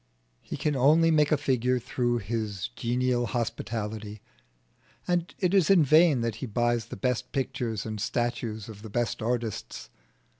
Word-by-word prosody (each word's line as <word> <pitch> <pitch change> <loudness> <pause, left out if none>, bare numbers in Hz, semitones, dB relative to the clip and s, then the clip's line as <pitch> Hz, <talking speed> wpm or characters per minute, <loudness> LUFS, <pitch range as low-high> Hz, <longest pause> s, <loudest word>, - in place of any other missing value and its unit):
He - - -6
can 150 +1 0
only 155 +5 +5
make 150 -1 +3
a 155 - +4
figure 130 -3 +1
through 120 0 -1
his 105 - -3
genial 120 - 0
hospitality. 110 -2 -4 0.9
It 175 +1 0
is 190 -6 +4
in 190 -5 +6
vain 155 -2 +5
that 115 -2 -2
he 130 - -5
buys 120 +1 0
the - - -8
best 125 +4 -1
pictures 125 -5 -2
and 110 -2 -4
statues 120 -2 -2
of 105 -2 -10
the 110 - -9
best 120 +1 -1
artists. 115 - -3
120 Hz, 150 wpm, -27 LUFS, 110-135 Hz, 0.9 s, in